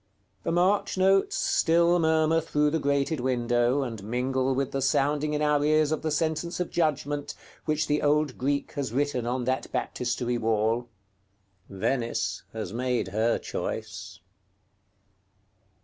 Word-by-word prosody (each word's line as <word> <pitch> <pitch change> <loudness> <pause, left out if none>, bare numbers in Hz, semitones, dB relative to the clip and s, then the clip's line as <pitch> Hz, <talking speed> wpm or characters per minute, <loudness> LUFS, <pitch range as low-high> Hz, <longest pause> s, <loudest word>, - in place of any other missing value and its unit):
The - - -2
march 185 +4 +2
notes 195 +1 +3
still 170 +1 +3
murmur 160 0 +3
through 150 -2 +1
the 160 - 0
grated 140 +1 0
window, 120 +1 +1
and 115 -6 -6
mingle 130 +4 0
with 135 0 -1
the 135 - -2
sounding 145 +3 +1
in 150 - 0
our 150 -1 +2
ears 155 0 +3
of 155 - -1
the 160 - -1
sentence 160 +3 -1
of 180 - -2
judgment, 145 -3 -1 0.3
which 155 0 0
the 150 0 0
old 150 -2 +2
Greek 140 +2 -1
has 140 -6 -3
written 130 -2 -1
on 125 +1 -1
that 130 +2 -2
Baptistery 120 0 -2
wall. 115 +2 0 0.8
Venice 115 +5 -1
has 110 -4 -5
made 125 -3 -1
her 110 +4 +1
choice. 100 -4 -5
140 Hz, 140 wpm, -27 LUFS, 120-155 Hz, 0.8 s, notes